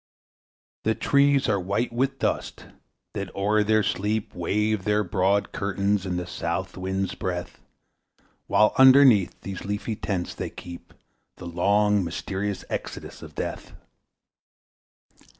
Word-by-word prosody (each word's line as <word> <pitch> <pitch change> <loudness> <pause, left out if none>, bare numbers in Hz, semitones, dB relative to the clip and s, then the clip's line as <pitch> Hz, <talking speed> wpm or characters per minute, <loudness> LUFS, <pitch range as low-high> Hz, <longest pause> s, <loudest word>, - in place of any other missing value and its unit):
The 110 0 +1
trees 140 -1 +3
are 100 -2 +2
white 100 +7 -1
with 130 +3 0
dust, - - -2 0.5
that 100 -3 -4
o'er 105 +2 +2
their 110 0 +3
sleep 105 +2 -1
Wave 105 +4 0
their 105 +1 +2
broad 100 +2 +1
curtains 100 0 -1
in 90 -1 -2
the 90 - -3
south 85 +2 -3
wind's 95 +1 -2
breath, 90 -1 -5 0.9
While 105 0 +4
underneath 130 -7 +7
such 100 -2 -5
leafy 105 +2 -3
tents 95 -4 -3
they - - -5
keep 85 0 -11 0.4
The - - -9
long, 100 +4 +2
mysterious 95 +4 -4
Exodus - - -6
of - - -11
Death. - - -5
100 Hz, 125 wpm, -25 LUFS, 95-105 Hz, 0.9 s, underneath